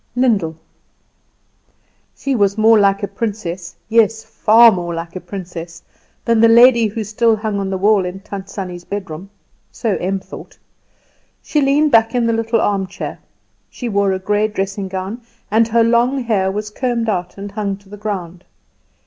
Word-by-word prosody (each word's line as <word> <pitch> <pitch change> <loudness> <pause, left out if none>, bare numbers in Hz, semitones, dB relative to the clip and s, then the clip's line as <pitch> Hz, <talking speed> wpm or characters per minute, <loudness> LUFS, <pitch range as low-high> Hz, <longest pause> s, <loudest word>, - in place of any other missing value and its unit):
Lyndall. 210 -11 +1 1.6
She 275 - -2
was 200 -2 +1
more 220 0 +5
like 200 0 +2
a - - 0
princess, 195 -4 -5
yes, 225 -1 +2
far 225 +1 +5
more 175 -3 -3
like 165 +1 -6
a 185 - -5
princess, 175 -3 -8 0.4
than 230 -1 +2
the 230 - +6
lady 235 0 +6
who 220 +2 -4
still 220 +2 +2
hung 215 -1 -3
on 195 -1 -2
the 190 - -2
wall 205 +1 +3
in 180 +1 -5
Tant 195 -1 -8
Sannie's 180 -3 -6
bedroom. 190 -2 -6 0.4
So 220 -4 -1
Em 190 +2 -2
thought. - - -12 0.9
She 300 - 0
leaned 285 +2 +3
back 225 +1 +4
in 240 -1 +2
the 230 - +1
little 225 0 0
armchair; 195 -3 -2 0.5
she 245 - -6
wore 200 -2 +1
a 190 - 0
grey 205 +3 0
dressing 195 -1 -3
gown, 190 +5 -5 0.3
and 225 +1 +3
her 230 0 +3
long 240 +3 +2
hair 200 -5 +1
was 210 +1 -4
combed 240 -1 -2
out 180 -4 -2
and 200 0 -7
hung 200 -1 -3
to 200 0 -23
the 205 - -10
ground. 185 -4 -5
205 Hz, 170 wpm, -18 LUFS, 190-230 Hz, 1.6 s, the